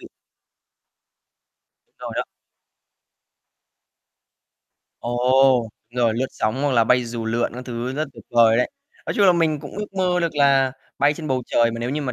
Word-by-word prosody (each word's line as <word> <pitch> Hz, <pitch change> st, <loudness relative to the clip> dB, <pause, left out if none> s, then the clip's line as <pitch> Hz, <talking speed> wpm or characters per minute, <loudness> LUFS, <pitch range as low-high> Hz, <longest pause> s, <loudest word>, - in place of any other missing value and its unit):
vị. -, -, -12 dB, 1.9 s
Rồi -, -, -7 dB
đó. -, -, +1 dB, 2.8 s
Ồ, 125 Hz, 0 st, +3 dB, 0.2 s
rồi 120 Hz, -2 st, +1 dB
lướt 130 Hz, +3 st, -1 dB
sóng, 115 Hz, +6 st, -2 dB
hoặc 145 Hz, -, +1 dB
là 115 Hz, -2 st, +4 dB
bay 125 Hz, +2 st, +3 dB
dù 115 Hz, -1 st, -5 dB
lượn 115 Hz, +1 st, 0 dB
các 125 Hz, -, -7 dB
thứ 120 Hz, +1 st, -4 dB
rất 150 Hz, +1 st, -3 dB
tuyệt 115 Hz, -4 st, -14 dB
vời 115 Hz, -1 st, +5 dB
đấy. 125 Hz, -, +1 dB, 0.4 s
Nói -, -, -2 dB
chung 200 Hz, -2 st, +4 dB
là 180 Hz, -, +7 dB
mình 160 Hz, -4 st, +1 dB
cũng -, -, -9 dB
ước 210 Hz, -1 st, -6 dB
mơ 180 Hz, -2 st, +1 dB
được 170 Hz, -2 st, -1 dB
là 135 Hz, -2 st, +3 dB, 0.3 s
bay 145 Hz, +1 st, +3 dB
trên 155 Hz, 0 st, -7 dB
bầu 130 Hz, -1 st, 0 dB
trời 115 Hz, 0 st, +2 dB
mà 115 Hz, -, -6 dB
nếu 120 Hz, +2 st, -2 dB
như 150 Hz, +1 st, -2 dB
mà 130 Hz, -2 st, -3 dB
130 Hz, 175 wpm, -22 LUFS, 120-145 Hz, 2.8 s, là